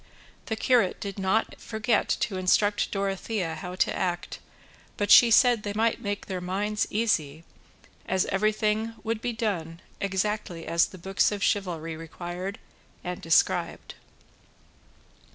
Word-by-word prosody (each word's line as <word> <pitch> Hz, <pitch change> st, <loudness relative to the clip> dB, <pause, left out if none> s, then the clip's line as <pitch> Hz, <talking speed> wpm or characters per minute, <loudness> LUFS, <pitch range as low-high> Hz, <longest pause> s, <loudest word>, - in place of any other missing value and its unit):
The 220 Hz, -, -1 dB
curate 225 Hz, -4 st, +2 dB
did 200 Hz, -1 st, -6 dB
not 195 Hz, +4 st, 0 dB
forget 220 Hz, 0 st, 0 dB
to 195 Hz, -, -1 dB
instruct 205 Hz, +3 st, +2 dB
Dorothea 195 Hz, -2 st, -2 dB
how 180 Hz, +2 st, -6 dB
to -, -, +1 dB
act, 175 Hz, -1 st, -3 dB, 0.6 s
but 205 Hz, -, 0 dB
she 240 Hz, -, +9 dB
said 240 Hz, 0 st, +5 dB
they 205 Hz, -1 st, -4 dB
might 225 Hz, +1 st, +1 dB
make 205 Hz, -2 st, -3 dB
their 185 Hz, -2 st, -4 dB
minds 205 Hz, +4 st, -1 dB
easy, 165 Hz, -9 st, 0 dB, 0.6 s
as 190 Hz, 0 st, +1 dB
everything 215 Hz, +2 st, 0 dB
would 225 Hz, -1 st, -2 dB
be 245 Hz, -, -1 dB
done 180 Hz, -8 st, -3 dB, 0.2 s
exactly 195 Hz, -3 st, -2 dB
as 170 Hz, +1 st, +3 dB
the 185 Hz, -, -12 dB
books 195 Hz, +4 st, +1 dB
of 205 Hz, -1 st, -3 dB
chivalry 165 Hz, -5 st, -1 dB
required 175 Hz, +4 st, -6 dB, 0.5 s
and 180 Hz, 0 st, -5 dB
described. 165 Hz, 0 st, +1 dB
200 Hz, 135 wpm, -27 LUFS, 180-215 Hz, 0.6 s, she